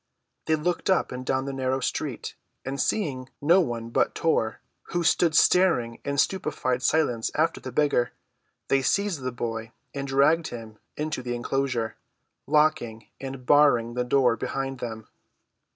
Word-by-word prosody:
They 160 - +4
looked 175 +5 -2
up 190 - +2
and 125 0 -5
down 130 +1 0
the 140 - -4
narrow 130 0 -1
street, 125 - -3 0.3
and 135 0 -2
seeing 130 -11 -1
no 170 +6 +5
one 115 -6 -4
but - - +1
Tor, 115 -9 0 0.3
who 175 -1 -2
stood 165 -1 +3
staring 155 -12 +3
in 140 0 -2
stupefied 130 -7 0
silence 130 -6 +1
after 160 +2 +1
the 130 - -6
beggar, 135 -3 +2 0.6
they 135 - +3
seized 200 +1 0
the 130 0 -2
boy 115 -2 -5 0.2
and 140 0 -4
dragged 145 +5 +3
him 110 -2 -9 0.2
into 150 -3 -2
the 120 -1 -3
enclosure, 120 -2 -2 0.5
locking 145 -8 +1
and 135 -2 -7
barring 125 -5 +4
the 125 0 0
door 125 -1 +3
behind 135 +1 -4
them. 110 -3 -6
135 Hz, 150 wpm, -26 LUFS, 120-150 Hz, 0.6 s, no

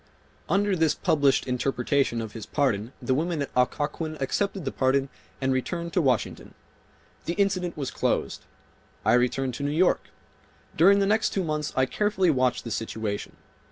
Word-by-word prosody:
Under 200 0 +2
this 160 -3 +2
published 145 -7 +2
interpretation 125 -1 0
of 110 -2 -6
his 110 -2 -8
pardon 115 -6 0
the 130 - 0
women 160 +1 0
at - - -7
Occoquan 150 +5 -1
accepted 195 +6 -1
the 135 - -1
pardon 135 +1 +1 0.3
and 135 0 +1
returned 170 +7 -3
to 180 - +3
Washington. 130 -7 -1 0.7
The 170 - -1
incident 185 -3 0
was 140 -3 -3
closed. - - -1 0.6
I 110 - +4
returned 125 +1 +1
to 140 - -5
New 145 - 0
York. 165 +5 +2 0.7
During 195 +5 +6
the 200 - +2
next 210 +1 +2
two 195 - 0
months 155 -2 -2
I 130 - +3
carefully 190 +2 +1
watched 130 -3 +1
the 115 - -6
situation. 110 -2 -4
145 Hz, 160 wpm, -26 LUFS, 130-175 Hz, 0.7 s, During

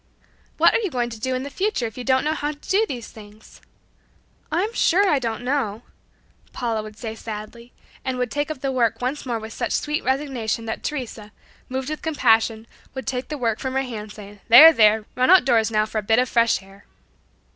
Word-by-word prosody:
"What - - +5
are - - +3
you 420 -4 -2
going 240 -4 -2
to 225 - -8
do 260 +3 -2
in 255 - -3
the 285 - -7
future 390 - -1
if 220 - -6
you 250 - -6
don't 260 +1 +2
know 305 - 0
how 300 -1 -3
to - - -18
do 410 +7 +1
these 245 - -6
things?" 215 0 -15 0.9
"I'm 380 +8 0
sure 395 0 +3
I 295 -6 +3
don't 230 -1 -4
know," 245 -5 -2 0.7
Paula 230 -3 -2
would 215 0 -11
say 225 -2 -5
sadly, 225 +2 -9 0.3
and 260 -1 -3
would 250 -2 -2
take 290 +1 -2
up 305 -4 -6
the 275 - -1
work 240 -4 +1
once 260 +3 -3
more 235 -2 -1
with 220 0 -8
such - - -3
sweet 300 +1 -1
resignation 260 -5 -2
that 220 - -4
Teresa, 235 -7 -5 0.4
moved 260 +2 -3
with 305 - -5
compassion, 225 -7 +2 0.3
would 265 - -5
take 255 -1 -3
the 300 - -5
work 230 -4 -1
from 260 -1 -4
her 270 - +1
hands 215 -4 -7
saying 205 -1 -12
"There! 300 +8 +10
There! 215 -3 +4
Run 255 0 +1
outdoors 240 -11 +5
now 215 -1 +1
for 215 0 -3
a - - -3
bit 220 +2 +2
of 250 +1 +2
fresh 230 -4 +2
air." 195 +1 -18
245 Hz, 215 wpm, -22 LUFS, 220-275 Hz, 0.9 s, There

